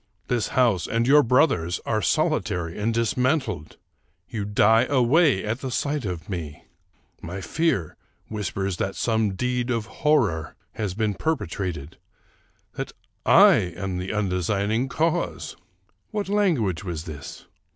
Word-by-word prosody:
This 120 -4 +1
house 115 -9 +3
and 115 +1 0
your 145 +3 +7
brother's 115 - +2
are 110 -2 0
solitary 85 0 0
and 110 +3 +1
dismantled! 115 - 0 0.5
You 105 -4 -4
die 110 +3 +4
away 135 - +3
at 110 +4 -2
the 130 - -3
sight 145 +1 -1
of 90 -5 -5
me! 85 -3 -6 0.6
My 90 +4 -6
fear 100 - -1 0.3
whispers 100 -3 -3
that 95 0 -2
some 110 -4 0
deed 125 +3 -1
of 115 -3 0 0.2
horror 110 - +2 0.2
has 100 -4 -4
been 110 -1 0
per 160 +9 0
petrated; 85 - -5 0.8
that - - -5 0.3
I - - +8 0.2
am 95 -2 -3
the 90 +1 -4
undesigning 105 +4 0
cause." 160 +3 -1 0.5
What 205 -2 -3
language 155 - +1
was 85 -5 -4
this? 75 -5 -9
110 Hz, 130 wpm, -24 LUFS, 90-125 Hz, 0.8 s, I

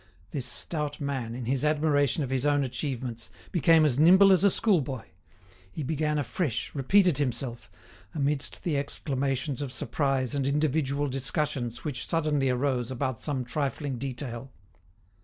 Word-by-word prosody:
This 130 -4 -2
stout 150 +2 -1
man, 130 -5 -3
in 125 -1 -5
his 130 +3 0
admiration 150 -1 +2
of 130 - -4
his 130 -1 0
own 145 -1 +2
achievements, 125 -3 -4 0.2
became 165 -3 +5
as 140 -3 +2
nimble 190 +5 +7
as 190 0 +4
a 200 - +6
schoolboy; 145 - +1 0.7
he 155 - -5
began 150 +1 -1
afresh, 145 0 -2
repeated 170 +3 +3
himself, 120 -6 -3 0.5
amidst 145 -1 -1
the 160 -5 0
exclamations 140 0 -1
of 140 -3 -4
surprise 135 -2 -1
and 140 -2 0
individual 145 -1 0
discussions 130 -2 -2
which 135 -6 -3
suddenly 150 -4 +1
arose 125 -1 0
about 130 -1 -3
some 135 -4 -2
trifling 140 0 -3
detail. 130 -1 -5
140 Hz, 140 wpm, -27 LUFS, 130-150 Hz, 0.7 s, nimble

